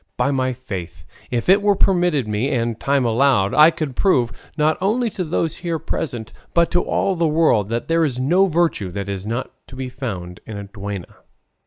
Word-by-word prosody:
By 140 - +1
my 130 -1 0
faith, 90 - -7 0.2
if 120 -2 -2
it 195 +3 +6
were 205 0 +3
permitted 175 - +2
me 105 +6 -1
and 115 -4 -1
time 140 -2 +1
allowed, 115 -4 +3
I 155 +2 +8
could 155 -5 -4
prove, 125 - +2 0.3
not 155 +1 +3
only 225 +4 +1
to 185 - -3
those 165 -1 -1
here 170 -2 -2
present, 120 -7 -4 0.2
but 170 0 +3
to 175 - +3
all 195 - 0
the 170 -1 +1
world, 150 -10 +2
that 115 +1 -2
there 165 0 +2
is 130 -5 -1
no 175 +9 +3
virtue 165 - 0
that 100 +2 -5
is 100 0 -4
not 120 +4 -3 0.2
to 130 - -12
be 130 0 -4
found 100 -9 -6
in 110 - -6
a 100 - -5
duenna." 100 -2 -7
130 Hz, 200 wpm, -21 LUFS, 110-165 Hz, 0.3 s, I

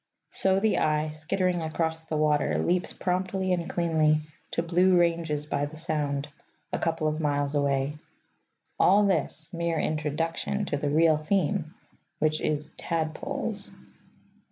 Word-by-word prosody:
So 190 0 +3
the 220 +1 +2
eye, 155 0 +1
skittering 175 +3 -1
across 160 0 -1
the 160 -1 -2
water, 150 -1 +2
leaps 180 +1 +1
promptly 185 +1 -1
and 170 -2 -2
cleanly 155 -3 +2 0.3
to 165 - -1
blue 180 +2 +4
ranges 165 -4 +1
by 145 -1 -1
the 155 +2 -11
Sound, 150 -3 -2 0.5
a - - 0
couple 165 -2 0
of 155 +1 -1
miles 145 -2 0
away. 140 0 0 0.8
All 205 +3 +5
this, 160 -2 -1
mere 170 -1 -1
introduction 165 +6 -1
to - - -1
the 145 0 -1
real 160 +1 +4
theme, 160 0 0 0.4
which 155 0 +1
is 150 0 -1
Tadpoles. 160 -2 -2
160 Hz, 135 wpm, -27 LUFS, 150-175 Hz, 0.8 s, All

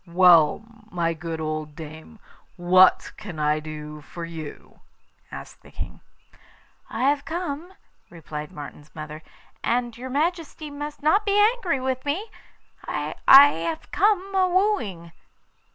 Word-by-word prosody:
'Well, 170 0 +5 0.3
my 170 -3 -1
good 165 0 -6
old 155 -1 -4
dame, 160 +7 -10 0.4
what 185 +1 +5
can 195 -7 -8
I 150 0 +1
do 150 -1 -8
for 170 +3 -8
you?' 160 -3 -9 0.5
asked - - -10
the - - -17
King. - - -8 0.9
'I - - -3
have 285 +1 +2
come,' 340 +1 -5 0.4
replied 150 -3 -8
Martin's 145 0 -10
mother 155 0 -7 0.4
'and 240 0 0
your 255 +2 -7
Majesty 310 +1 -2
must 290 +1 -7
not 360 +8 +4
be 405 -1 +1
angry 415 - +2
with 260 0 -2
me 355 +10 -3 0.5
I - - -3
have 170 - +6
come 395 -1 +2
a 375 -1 +3
wooing. 245 - 0
205 Hz, 130 wpm, -24 LUFS, -, 0.9 s, have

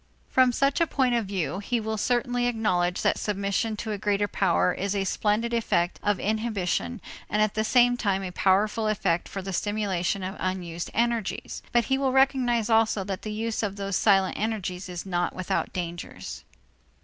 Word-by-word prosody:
From 255 -1 +5
such 275 +5 +1
a 335 - +4
point 260 -5 +1
of 230 -4 0
view, 190 -1 -2
he 235 +4 -1
will 220 0 -2
certainly 245 +2 +1
acknowledge 185 -7 0
that - - +2
submission 205 +2 -1
to 220 +1 -4
a 205 - -3
greater 205 0 +1
power 90 - +2
is 200 +1 -2
a 195 - +1
splendid 215 +4 0
effect 185 -6 +1
of 205 -2 +1
inhibition 200 - -1 0.3
and 210 - 0
at 215 -1 +2
the 215 - 0
same 245 +2 +4
time 195 -4 0
a 185 - -4
powerful 210 +4 +2
effect 190 -5 0
for 195 - -5
the 195 0 -5
stimulation 200 -2 -1
of 190 +2 -4
unused 175 -2 -3
energies; 235 -2 -1
but 240 -2 +3
he 265 +3 +1
will 270 -1 +1
recognize 255 -4 +3
also 220 -3 +3
that 190 -1 -4
the 215 - -5
use 220 +1 -2
of 200 -3 -2
those 200 -1 -3
silent 195 -2 +3
energies 195 -4 -3
is 175 0 -6
not 175 -2 -1
without 185 -1 -1
dangers. 175 -1 -6
205 Hz, 185 wpm, -26 LUFS, 190-230 Hz, 0.3 s, From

